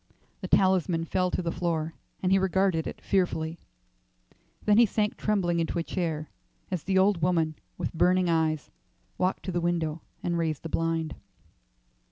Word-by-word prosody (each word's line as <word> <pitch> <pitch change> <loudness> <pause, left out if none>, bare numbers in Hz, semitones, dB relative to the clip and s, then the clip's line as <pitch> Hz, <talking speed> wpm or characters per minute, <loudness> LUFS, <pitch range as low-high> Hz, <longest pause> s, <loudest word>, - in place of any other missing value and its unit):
The - - -5
talisman 180 -3 +3
fell 185 +2 +1
to 180 - -2
the 170 - -1
floor, 165 -2 -1 0.3
and 185 - +2
he 195 - +5
regarded 190 -3 +1
it - - -6
fearfully. 170 -4 0 1.1
Then 210 +1 +5
he 240 - +8
sank 210 +1 0
trembling 180 -5 +1
into 165 +1 -1
a 170 - 0
chair 160 -3 -3 0.4
as 180 -3 -1
the 190 +3 0
old 190 -2 +4
woman, 165 -2 +2 0.2
with - - -3
burning 180 +2 +3
eyes, 160 -3 +1 0.5
walked 185 +1 0
to 185 - -2
the 175 -1 -1
window 165 -2 -1 0.2
and 170 -1 0
raised 160 -3 -1
the 165 - -5
blind. 165 -1 -1
170 Hz, 165 wpm, -28 LUFS, 165-185 Hz, 1.1 s, he